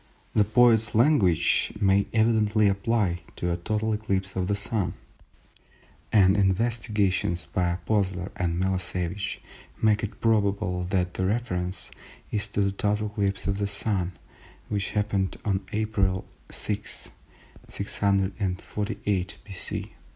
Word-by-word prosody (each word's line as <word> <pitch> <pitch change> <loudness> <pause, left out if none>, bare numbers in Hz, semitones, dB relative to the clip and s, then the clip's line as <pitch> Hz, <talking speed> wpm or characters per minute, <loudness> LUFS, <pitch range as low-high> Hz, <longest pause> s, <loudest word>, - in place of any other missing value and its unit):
The 105 - +5
poet's 115 +1 +4
language 105 - +3
may 100 0 +3
evidently 110 -1 +3
apply 100 -2 +1
to 90 - -1
a 85 - 0
total 110 +5 -1
eclipse 100 -3 -2
of 95 -1 0
the 100 - +1
Sun; 100 -3 -2 1.2
and 95 -2 +5
investigations 100 -3 +1
by 90 -1 0
Oppolzer 95 0 -1
and 85 -1 -1
Millosevich 95 +1 -2 0.4
make 105 -1 +3
it 105 - -5
probable 100 -4 +1
that 90 -1 0
the 95 - 0
reference 90 -5 -2 0.4
is 105 0 -1
to 100 -1 -1
the 100 0 +2
total 105 +2 0
eclipse 100 -2 -1
of 100 0 -1
the 100 - 0
Sun 100 -3 0 0.6
which 100 -2 -1
happened 100 -2 0
on 95 -2 +1
April 100 -4 0 0.2
6, 105 0 -5 0.6
648 100 -1 -1
B.C. 95 -4 -5
100 Hz, 120 wpm, -26 LUFS, 95-105 Hz, 1.2 s, The